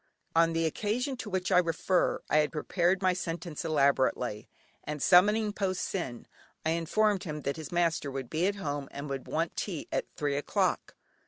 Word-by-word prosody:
On 165 0 +4
the 165 0 +1
occasion 225 - -1
to 225 - -6
which 185 -1 -1
I 180 - +7
refer, 180 +1 +1
I - - +2
had 150 -1 +3
prepared 175 +4 +1
my 185 -1 +4
sentence 170 -3 -4
elaborately, 135 -7 +1 0.3
and 150 0 -4
summoning 205 +7 +5
Po 195 -3 0
Sin, 170 -10 -4 0.4
I 160 - +2
informed 195 +5 +1
him 150 -2 -4
that 140 +2 -2
his 155 -3 -7
master 170 -4 +1
would 135 -2 -5
be 165 +8 0
at 200 - 0
home 145 -7 -3
and 140 +1 -6
would 135 -1 -4
want 165 +1 -1
tea 175 -7 -4
at - - -1
three 145 -1 -1
o'clock. 145 - 0
165 Hz, 180 wpm, -30 LUFS, 150-185 Hz, 0.4 s, I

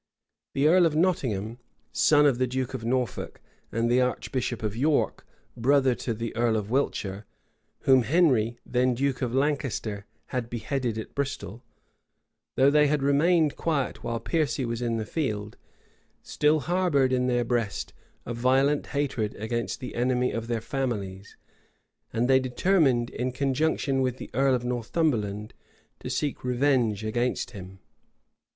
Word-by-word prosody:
The 140 +2 +3
earl 175 +1 +6
of 155 - -3
Nottingham, 125 - 0 0.3
son 150 -1 +4
of 135 -4 +3
the 130 - +2
duke 130 +1 -3
of 130 - -5
Norfolk, 125 -1 -2 0.3
and 115 +1 0
the 125 +2 +3
archbishop 125 -1 -2
of 105 -1 -2
York, 145 +5 0 0.3
brother 130 +2 +3
to 120 -1 -3
the 115 +1 -5
earl 115 -1 +2
of 105 0 -4
Wiltshire, 105 -6 -1 0.5
whom 130 -1 +5
Henry, 120 -5 +2
then 125 0 +1
duke 135 +1 -1
of 125 -1 -1
Lancaster, 135 -8 -1 0.2
had 125 -2 -3
beheaded 120 -1 -2
at 110 - -6
Bristol, 120 -6 -4 0.9
though 135 +2 +5
they 150 0 +5
had 145 -1 0
remained 155 +2 +3
quiet 150 -6 -2
while 115 -1 -2
Piercy 145 0 -1
was 115 0 -3
in 115 -1 0
the 110 - -3
field, 105 -7 -3 0.7
still 150 +1 +2
harbored 155 -5 +2
in 125 0 +1
their 120 -1 +1
breast 115 -4 -2 0.3
a 120 - -4
violent 135 +4 +2
hatred 125 -7 -2
against 110 -2 -3
the 125 - -6
enemy 125 +1 +1
of 115 0 -4
their 115 -2 -1
families; 105 -6 -4 0.7
and 120 +2 0
they 130 0 +5
determined, 130 -2 +2
in 125 +2 -2
conjunction 135 +1 0
with 130 -1 -1
the - - -9
earl 135 0 +3
of 125 -1 -3
Northumberland, 115 -4 -1 0.5
to - - -6
seek 145 -2 -2
revenge 125 -4 +1
against 120 +3 -1
him. 95 -1 -10
125 Hz, 150 wpm, -27 LUFS, 115-140 Hz, 0.9 s, earl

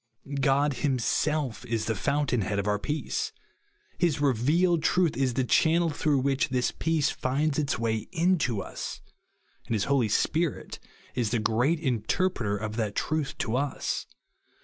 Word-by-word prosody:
God 140 +1 +3
him« 135 -3 +2
self 135 -1 0
is 115 -3 -2
the 110 - 0
fountain 140 +2 0
head 100 +2 -2
of 100 - -1
our 105 0 +1
peace; 150 +8 -2 0.7
his 165 -5 +2
revealed 150 +6 +2
truth 175 0 +2
is 130 -2 0
the 130 - +2
channel 165 +6 +3
throug 145 -1 +1
h 130 - 0
which 140 0 +1
this 125 -2 +1
peace 160 -3 0
finds 140 +3 0
its 145 -3 0
way 110 -1 -1
into 165 - +1
us; - - -6 0.7
and 115 - 0
his 105 - +1
Holy 135 -4 +2
Spirit 160 - 0 0.3
is 120 -4 0
the 120 - +1
great 120 +9 +1
inter 135 - 0
preter 105 - -2
of 110 +2 -5
that 105 -3 -1
truth 155 -2 -1
to 115 - -1
us. 140 +1 -2
135 Hz, 165 wpm, -27 LUFS, 115-155 Hz, 0.7 s, God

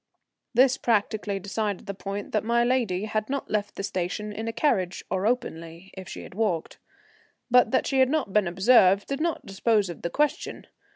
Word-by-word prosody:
This 260 +2 +5
practically 210 -2 0
decided 205 +1 -3
the 200 - -4
point 200 +1 -6
that 215 - 0
my 235 +1 +2
lady 235 -6 0
had 215 +1 -2
not 275 0 -3
left 205 -1 -1
the - - -5
station 200 +3 -3
in 220 +2 -5
a - - -1
carriage 195 - 0
or 190 +2 0
openly, 170 -7 -3
if 190 -1 -9
she - - -7
had - - -11
walked. 195 -6 -2 0.7
But 250 -2 +6
that 260 - +1
she 270 - +1
had 260 -1 +5
not 280 -10 -1
been 210 -3 +3
observed 195 +1 +4
did 275 +2 -3
not 335 -1 -1
dispose 200 0 +1
of 170 - -11
the 170 - -2
question. 295 - -1
210 Hz, 190 wpm, -26 LUFS, 190-240 Hz, 0.7 s, But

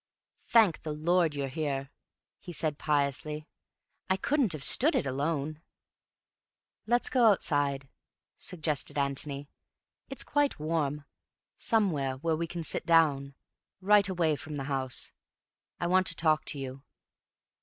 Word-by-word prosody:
"Thank 220 -8 +4
the 155 - -4
Lord 165 0 +1
you're 140 -1 -2
here," 140 -1 -3 0.5
he 180 - -9
said 155 -3 -1
piously. 150 +1 -1 0.6
"I 190 - +2
couldn't 265 - +1
have 150 -3 -4
stood 305 - +5
it - - +1
alone." 145 +3 -2 1.3
"Let's 240 +2 +3
go 250 -3 +4
outside," 145 -8 +1 0.5
suggested 155 -5 -3
Antony. 140 0 -1 0.6
"It's 270 - -2
quite 290 -1 0
warm. 150 -2 -2 0.5
Somewhere 155 - 0
where 160 +3 0
we 165 +1 -3
can 170 0 -5
sit - - +1
down, 145 -5 +3 0.4
right 200 +1 +4
away 170 -4 +1
from 150 +1 -8
the 140 - -4
house. 135 -2 -2 0.7
I - - -2
want 185 +2 +3
to 170 - +1
talk 155 -1 +2
to 145 - -1
you." 135 0 -6
155 Hz, 135 wpm, -29 LUFS, 140-180 Hz, 1.3 s, stood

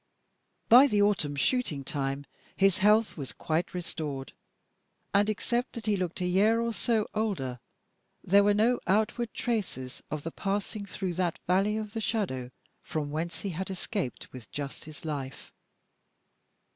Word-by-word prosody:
By 255 +5 +9
the 205 -5 +3
autumn 185 -9 +1
shooting 155 - +1
time 135 0 -2 0.3
his 195 +1 +3
health 210 +1 +4
was 135 -5 -5
quite 165 +3 -1
restored, 150 -6 -4 0.8
and 205 +1 +4
except 240 +3 -1
that 230 - -6
he 210 -2 +3
looked 185 -1 -3
a - - +1
year 205 +6 +4
or 235 0 0
so 220 -1 +1
older 185 - -1 0.6
there 200 +2 +5
were 205 0 +4
no 235 +4 +3
outward 220 +4 +1
traces 190 - -3
of 155 -2 -4
the 165 - -4
passing 200 +2 -2
through 185 -2 -3
that 175 -1 0
valley 195 +4 +2
of 215 -1 -4
the 225 - -2
shadow, 175 - -1 0.3
from 150 -2 -3
whence 165 +3 -3
he 200 - -2
had 185 +2 -4
escaped 190 - -4
with 125 -4 -10
just 140 -1 -5
his 155 +1 -11
life. 140 -4 -5
195 Hz, 155 wpm, -29 LUFS, 150-215 Hz, 0.8 s, By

